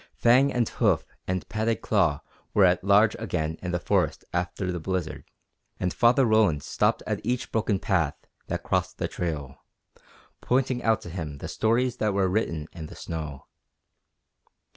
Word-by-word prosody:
Fang 130 +4 +4
and 120 -2 +1
hoof - - +1 0.2
and 90 -1 -2
padded 110 -1 -1
claw - - +2 0.3
were 100 - +6
at 90 0 +3
large 100 +2 +5
again 80 +1 -2
in 90 - -4
the 90 0 -1
forests - - 0
after 90 +1 -2
the 90 - -3
blizzard, 90 -1 -3 0.5
and 90 -1 -1
Father 125 +2 +4
Roland 110 -10 +3
stopped - - +1
at - - -2
each 120 +2 -2
broken 110 -2 +1
path 85 -8 0 0.3
that - - -3
crossed - - -1
the - - -1
trail, 75 -6 -5 0.8
pointing 130 0 +1
out 110 -2 +2
to 85 - -9
him 80 -5 -5
the - - -6
stories 120 +3 +1
that 105 -2 0
were 95 -1 +3
written 85 -6 -1
in 80 -3 -7
the - - -11
snow. 75 -4 -6
95 Hz, 165 wpm, -26 LUFS, 85-115 Hz, 0.8 s, were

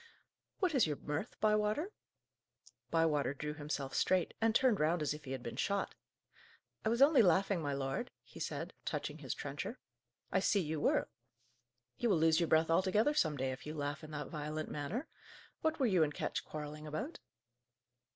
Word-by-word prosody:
"What 370 -5 +1
is 255 - +4
your 150 - -1
mirth, 150 - -4
Bywater?" 215 - +2 1.0
Bywater 150 -5 +2
drew 150 +1 -4
himself 145 -2 -4
straight, 185 -2 +2
and 225 0 +3
turned 245 -6 +4
round 155 +1 +2
as 145 - 0
if 150 -1 -9
he 130 - -6
had 130 -2 -4
been - - -6
shot. 200 -1 0 0.9
"I 220 - +2
was 235 +4 +5
only 280 -3 +7
laughing, 190 -1 +3
my 145 -2 -1
lord," 135 - -2
he - - -13
said, - - -4
touching - - -3
his - - -4
trencher. - - -5 0.5
"I - - +3
see 205 - +3
you 160 -3 -2
were; - - +2 0.9
you 240 - +2
will 190 - +4
lose 160 +1 +4
your 170 - +2
breath 160 +1 +4
altogether 195 - +3
some 155 - +2
day, 130 0 0
if 130 +3 -7
you 155 - -4
laugh 145 +1 -3
in 155 - -8
that 145 -1 -5
violent 155 0 -4
manner. 150 - -3 0.6
What 315 0 0
were 265 - +3
you 190 -7 +4
and 150 -2 +2
Ketch - - -2
quarrelling 150 0 -6
about?" 155 - -4
160 Hz, 180 wpm, -35 LUFS, 150-210 Hz, 1.0 s, only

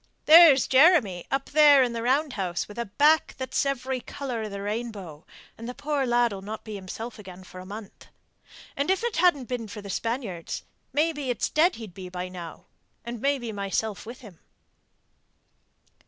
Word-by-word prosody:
There's 315 -5 +8
Jeremy 260 - +4
up 270 0 -2
there 295 -2 +7
in 245 -2 -1
the 230 - -3
round 270 +5 +1
house 180 -3 -3
with 210 +3 -10
a 235 - -1
back 300 +9 +3
that's 260 +1 -1
every 265 -1 -2
colour 250 -1 -5
of 215 - -4
the 200 0 -6
rainbow; 205 -8 -6 0.3
and 230 +1 -6
the 250 - -7
poor 285 -2 -1
lad'll 240 -5 +1
not 215 +3 -7
be 215 - -8
himself 210 +4 -7
again 185 -2 -11
for 185 0 -12
a 185 - -10
month. 205 0 -10 0.7
And 280 +4 -1
if 380 +4 +1
it 475 -2 -2
hadn't 330 -7 +3
been 245 -3 -4
for 210 - -8
the 200 - -6
Spaniards 225 -7 -4 0.3
maybe 295 -1 0
it's 245 - -1
dead 340 +4 +3
he'd 220 -6 -9
be 185 -1 -9
by 180 0 -5
now, 175 -3 -9 0.4
and 235 -1 -6
maybe 275 -5 -1
myself 200 0 -3
with 240 +3 -9
him." 200 -9 -14
235 Hz, 180 wpm, -26 LUFS, 200-275 Hz, 0.7 s, There's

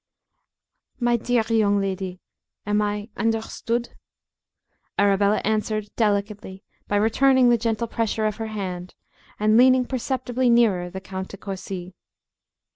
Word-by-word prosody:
"My 240 -1 +2
dear 235 0 +1
young 210 -3 +3
lady, 190 -2 -3 0.4
am 210 +1 +1
I 210 +1 -2
understood?" 230 +1 -1 1.1
Arabella 200 +1 +3
answered, 215 0 -1
delicately, 205 -2 -1 0.2
by 205 - -1
returning 250 +4 +4
the 240 - +4
gentle 225 0 -1
pressure 225 -1 -1
of 215 -1 -1
her 225 -1 -4
hand, 185 -4 -5 0.4
and 215 +1 +4
leaning 255 +1 +5
perceptibly 255 0 -1
nearer 210 -7 +3
the 190 +1 -7
Count 190 -1 -6
De 200 - -10
Courci. 190 -2 -6
215 Hz, 120 wpm, -23 LUFS, 195-235 Hz, 1.1 s, leaning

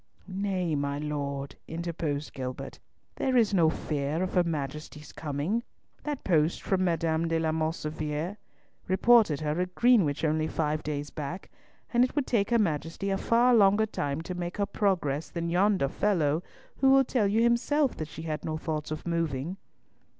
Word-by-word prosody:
"Nay, 190 -3 -1
my 140 -1 -1
Lord," 140 -2 -4
interposed 160 -3 -3
Gilbert, 130 -1 -6 0.4
"there 260 -1 +1
is 220 -3 +3
no 170 -4 +5
fear 150 +1 -2
of 185 - -3
her 180 - +4
Majesty's 150 -1 -5
coming. 155 +9 -2 0.4
That 295 -3 -4
post 160 -2 +2
from 185 -1 +1
M. 170 -1 +2 0.3
de 165 0 +1
la 160 -1 +1
Mauvissiere 155 +2 -2 0.5
reported 190 -5 +4
her 155 +3 0
at 180 0 -4
Greenwich 205 - +3
only 155 0 +1
five 155 -1 -1
days 145 -2 -4
back, 155 +5 -6 0.4
and 240 +1 +5
it 255 - -1
would 290 -3 +1
take 205 -5 +1
her 235 - +4
Majesty 170 0 -1
a 195 - +1
far 240 +2 +4
longer 205 -1 +5
time 145 -8 -3
to 180 - -5
make 175 +1 -4
her 200 - +1
progress 170 -8 0
than 170 -1 -3
yonder 190 -4 +3
fellow, 160 -2 +1 0.4
who 270 - +4
will 270 0 +6
tell 235 -5 +1
you 220 +3 +2
himself 260 +4 +2
that 155 - -4
she 160 +1 -9
had 155 -2 -3
no 155 -1 -2
thoughts 155 -1 -3
of 155 0 -5
moving." 165 0 -2
165 Hz, 170 wpm, -28 LUFS, 150-200 Hz, 0.5 s, will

